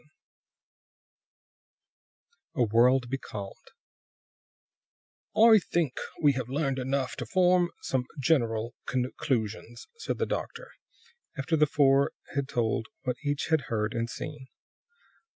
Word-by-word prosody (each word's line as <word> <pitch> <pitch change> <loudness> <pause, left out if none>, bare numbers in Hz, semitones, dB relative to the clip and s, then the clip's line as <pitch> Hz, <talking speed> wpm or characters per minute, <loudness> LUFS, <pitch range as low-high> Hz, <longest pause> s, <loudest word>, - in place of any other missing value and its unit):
VII 150 - -29 2.5
A 125 - +3
WORLD 120 +3 +4
BECALMED 105 -6 -7 1.7
"I 220 0 +8
think 165 -7 -1 0.2
we 145 - +7
have 130 -2 -4
learned 135 -1 -1
enough 130 0 -1
to - - -5
form 180 -2 +3
some 130 -2 -1
general 115 -5 +1
conclusions," 120 -2 -2
said - - -3
the - - 0
doctor, - - -5 0.7
after 150 +5 0
the 150 -1 +4
four 140 -1 +3 0.2
had 140 -1 -1
told 115 -2 0 0.2
what 125 -2 -2
each 145 0 -2
had 160 -6 +2
heard 110 0 -1
and 115 0 -2
seen. 145 0 -7
135 Hz, 115 wpm, -28 LUFS, 120-150 Hz, 2.5 s, I